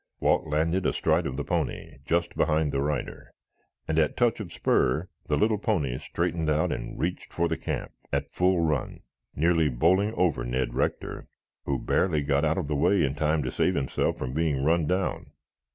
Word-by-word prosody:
Walt - - +2
landed 80 +5 +1
astride - - +1
of 65 - -5
the 75 - -2
pony - - -3
just 85 +1 0
behind 80 -1 +1
the 70 - 0
rider, 70 -3 -3 0.6
and 80 0 +1
at 75 -2 +1
touch 120 -2 +2
of 95 -6 -6
spur 75 +9 +1 0.2
the - - +1
little 105 0 +2
pony 75 - 0
straightened 80 -2 -2
out 75 +1 +1
and - - -5
reached 90 +2 -3
for 85 0 0
the - - -1
camp - - -4 0.2
at - - 0
a - - -35
full 90 -1 +2
run, 75 -5 -1 0.3
nearly 80 0 +3
bowling 90 - +2
over 80 -9 +1
Ned 60 +1 -1
Rector, - - -2 0.4
who 70 - 0
barely 80 -1 +1
got 70 +1 +1
out 80 0 +1
of - - -2
the 75 - -1
way 95 +7 +3
in 70 - -1
time 75 +1 +1
to 65 - -3
save 90 - +1
himself 65 - 0
from 65 0 -4
being 75 -3 0
run 80 +1 +2
down. 90 +2 -2
80 Hz, 190 wpm, -27 LUFS, 70-85 Hz, 0.6 s, nearly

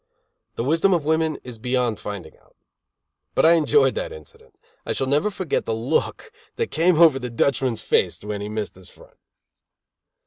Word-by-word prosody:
The - - -2
wisdom 165 +7 +3
of 160 -4 -2
women 160 0 +1
is 125 -3 -10
beyond 125 -2 -1
finding 95 -6 -7
out. - - -29 0.8
But - - +3
I 165 - +7
enjoyed 170 - +3
that - - -4
incident. 455 -1 -14 0.3
I - - -2
shall 135 - -1
never 145 +10 +1
forget 185 -6 -3
the 115 - 0
look 140 - -2 0.2
that 460 - -2
came 170 0 +2
over 160 -6 +6
the 125 -1 -5
Dutchman's 120 0 0
face - - +1
when 105 -1 -4
he 105 - -5
missed 105 -1 -4
his 95 -1 -14
front. - - -19
140 Hz, 175 wpm, -23 LUFS, 115-170 Hz, 0.8 s, I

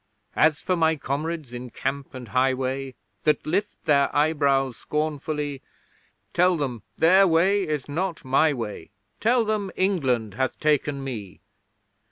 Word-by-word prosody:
As 155 -1 +4
for 185 - 0
my 160 -1 +3
Comrades 150 0 -4
in 125 +1 -6
camp 135 +4 -4
and 125 -3 -8
highway, 130 +2 0 0.3
That 150 - +2
lift 195 +7 -2
their 140 -3 +4
eyebrows 140 -4 +2
scornfully; 150 -2 -3 0.7
Tell 180 0 +4
them 130 -7 -3 0.2
their 190 +4 +6
way 185 +5 +3
is 150 -4 -2
not 165 +1 -3
my 140 +4 +3
way 110 - -5 0.3
Tell 235 +1 +3
them 210 -2 -1
England 130 - 0
hath 130 +3 -2
taken 145 -2 +1
me! 110 -8 -6
145 Hz, 135 wpm, -25 LUFS, 130-165 Hz, 0.7 s, their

